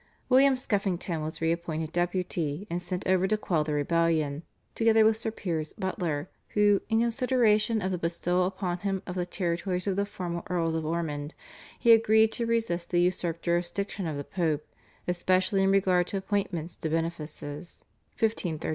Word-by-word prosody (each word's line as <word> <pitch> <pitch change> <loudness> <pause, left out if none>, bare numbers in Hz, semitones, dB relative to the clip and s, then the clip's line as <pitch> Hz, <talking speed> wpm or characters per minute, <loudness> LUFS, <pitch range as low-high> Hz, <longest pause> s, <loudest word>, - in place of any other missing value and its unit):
William 270 +1 +6
Skeffington 195 - -1
was 155 +1 -5
re 165 0 +2
appointed 165 -2 -3
Deputy 175 -2 -1
and 175 +1 -1
sent 180 +1 -4
over 190 0 +3
to 215 +2 +2
quell 170 -7 0
the 150 0 -3
rebellion, 155 -1 +1 0.3
together 225 -1 +4
with 220 0 +5
Sir 225 0 -2
Piers 165 -8 -3
Butler 175 -5 -2 0.3
who, 205 -1 +4
in 225 0 +3
consideration 235 -3 +2
of 190 - -1
the 180 - -2
bestowal 175 +2 0
upon 185 -2 -3
him 195 0 -2
of 180 - -5
the 180 -1 -2
territories 180 0 -2
of 195 -2 0
the 200 0 +1
former 175 -4 -4
Earls 170 -2 0
of 160 -1 -2
Ormond, 155 -3 -3 0.5
agreed 220 -1 +6
to 235 +1 -2
resist 220 -7 0
the 175 - +2
usurped 175 -2 0
jurisdiction 175 +2 -1
of 155 -3 -3
the 145 - -4
Pope 155 -2 -1 0.4
especially 185 +2 +2
in 195 - +3
regard 185 -2 +3
to 200 - -2
appointments 190 -4 -2
to 160 - -3
benefices 160 -1 -4 0.3
(1534). 180 -8 -1
180 Hz, 165 wpm, -28 LUFS, 165-205 Hz, 0.5 s, William